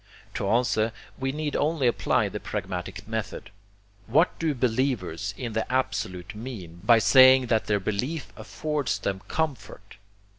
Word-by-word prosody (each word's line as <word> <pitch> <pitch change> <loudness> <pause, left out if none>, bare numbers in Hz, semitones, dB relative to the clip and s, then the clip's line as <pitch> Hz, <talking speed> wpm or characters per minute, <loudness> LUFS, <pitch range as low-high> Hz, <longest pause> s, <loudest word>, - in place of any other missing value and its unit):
To 100 - -2
answer, 110 -1 +2 0.3
we 135 0 -1
need 150 0 -3
only 150 -2 +1
apply 120 - +2
the - - -5
pragmatic 95 +3 -5
method. 110 -1 -5 0.6
What 150 +10 +2
do 160 -3 0
believers 110 - -1
in 120 -3 -4
the 110 +3 -2
Absolute 95 -8 -2
mean 105 -7 -8
by 115 +2 +6
saying 130 +3 +7
that 110 - +1
their 105 -1 +2
belief 125 - -3
affords 125 +6 -2
them 95 -1 -3
comfort? 105 -10 -4
115 Hz, 140 wpm, -26 LUFS, 100-130 Hz, 0.6 s, saying